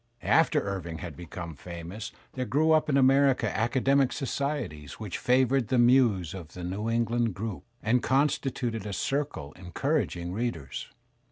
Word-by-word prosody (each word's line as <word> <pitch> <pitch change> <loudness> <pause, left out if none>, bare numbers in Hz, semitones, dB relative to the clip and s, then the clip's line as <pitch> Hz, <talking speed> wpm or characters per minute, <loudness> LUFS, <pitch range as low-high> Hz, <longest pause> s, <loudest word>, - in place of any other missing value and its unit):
After - - +4
Irving 90 -5 -4
had 80 -1 -7
become 85 0 -7
famous 85 +8 -7 0.2
there 130 -1 -2
grew 150 +8 +2
up 155 -1 +4
in 140 - +3
America 135 -4 +4
academic 130 +4 +2
societies 135 - -3
which 105 -4 -4
favoured 130 -1 +3
the 130 - +1
muse 120 - +4
of 85 -5 -9
the 90 - -7
New 100 +5 -2
England 115 -2 +1
group 105 -1 -5 0.2
and 120 +3 +3
constituted 130 -5 0
a 100 - -4
circle 135 - -2
encouraging 90 - -2
readers. 100 - -3
115 Hz, 145 wpm, -28 LUFS, 90-135 Hz, 0.2 s, After